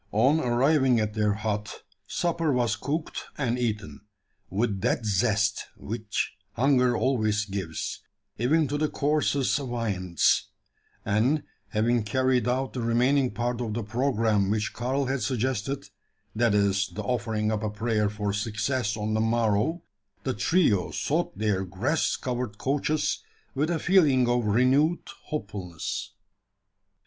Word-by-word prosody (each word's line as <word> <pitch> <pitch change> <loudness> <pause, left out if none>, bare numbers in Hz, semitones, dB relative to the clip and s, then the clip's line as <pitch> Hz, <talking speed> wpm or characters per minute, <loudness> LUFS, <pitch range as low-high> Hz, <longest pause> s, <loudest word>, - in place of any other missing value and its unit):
On 130 +9 +4
arriving 130 -1 +3
at 105 -1 -1
their 105 -1 +1
hut, 105 -1 -3 0.2
supper 165 -3 0
was 120 -3 +1
cooked 155 +5 -3
and 125 -3 0
eaten, 105 -11 -3 0.5
with 100 0 -1
that 115 - 0
zest 105 +1 +1
which 110 -1 -3 0.2
hunger 125 -1 +3
always 110 -5 +1
gives, 95 -5 -4 0.4
even 150 +6 +3
to 145 +2 -2
the 155 0 +1
coarsest 145 -2 +1
viands; 110 - 0 0.6
and, 115 +9 +2 0.2
having 115 +3 +1
carried 125 +2 +1
out 130 +2 0
the 125 - -3
remaining 125 +3 +2
part 120 +2 -2
of 110 -3 -3
the 115 - -2
programme 110 -3 +1
which 105 +1 -1
Karl 130 +3 -1
had 130 0 -1
suggested 130 +1 -1 0.5
that 115 -2 +3
is, 100 -1 +2
the 105 - -4
offering 110 -1 -1
up 105 -1 -1
a 110 - -1
prayer 105 0 0
for 105 -1 -2
success 110 +2 -1
on 105 0 -2
the 110 - +1
morrow 115 - +1 0.4
the 130 - -1
trio 115 - +2
sought - - -1
their 105 -3 0
grass 110 - 0
covered 125 -4 -3
couches 145 +4 0 0.3
with 150 +4 0
a 170 - +1
feeling 150 -9 +4
of 120 -1 +1
renewed 130 +10 +3 0.2
hopefulness. 100 - -5
120 Hz, 135 wpm, -27 LUFS, 105-130 Hz, 0.6 s, On